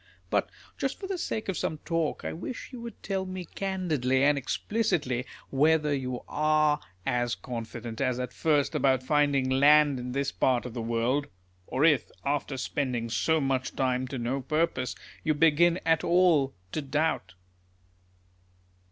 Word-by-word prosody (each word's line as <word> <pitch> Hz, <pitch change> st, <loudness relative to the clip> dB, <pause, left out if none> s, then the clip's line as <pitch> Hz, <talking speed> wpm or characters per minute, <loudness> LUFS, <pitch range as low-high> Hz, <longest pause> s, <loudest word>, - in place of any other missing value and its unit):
Ihit -, -, +2 dB, 0.3 s
just 270 Hz, -, -2 dB
for 390 Hz, -, -6 dB
the 380 Hz, -2 st, -3 dB
sake 220 Hz, -9 st, -3 dB
of 190 Hz, -, -1 dB
some 155 Hz, -, -2 dB
talk 165 Hz, -2 st, -1 dB
I -, -, -2 dB
wish 185 Hz, +9 st, -6 dB
you 245 Hz, -, -7 dB
would 235 Hz, 0 st, -9 dB
tell 195 Hz, -2 st, -1 dB
me 185 Hz, -1 st, -6 dB
candidly 160 Hz, -10 st, 0 dB
and 145 Hz, +1 st, +5 dB
explicitly, 145 Hz, -, -1 dB, 0.2 s
whether 150 Hz, +1 st, +3 dB
you 130 Hz, -3 st, -3 dB
are 155 Hz, 0 st, +2 dB, 0.3 s
as 120 Hz, -1 st, 0 dB
con 120 Hz, -2 st, -5 dB
fident 115 Hz, +1 st, -7 dB
as 130 Hz, -2 st, 0 dB
at 125 Hz, 0 st, -4 dB
first 150 Hz, -3 st, +1 dB
about 130 Hz, -2 st, +2 dB
finding 145 Hz, -1 st, +2 dB
land 145 Hz, +1 st, +5 dB
in 125 Hz, 0 st, -5 dB
this 140 Hz, 0 st, -1 dB
part 125 Hz, -2 st, +1 dB
of 125 Hz, -, -6 dB
the 120 Hz, -, -4 dB
world; 120 Hz, +5 st, 0 dB, 0.4 s
or 135 Hz, +4 st, +2 dB
if, 150 Hz, -5 st, +3 dB, 0.2 s
after 140 Hz, -1 st, -1 dB
spending 125 Hz, -3 st, -2 dB
so 160 Hz, +6 st, +2 dB
much 135 Hz, -2 st, -1 dB
time 130 Hz, -1 st, 0 dB
to 130 Hz, -, -5 dB
no 125 Hz, +3 st, -2 dB
purpose, 145 Hz, -2 st, 0 dB, 0.3 s
you 155 Hz, -1 st, +1 dB
begin 165 Hz, +3 st, +4 dB
at 165 Hz, -1 st, +3 dB
all 170 Hz, -, +3 dB, 0.2 s
to 155 Hz, -, -2 dB
doubt. 140 Hz, -, -1 dB
145 Hz, 160 wpm, -28 LUFS, 130-160 Hz, 0.4 s, and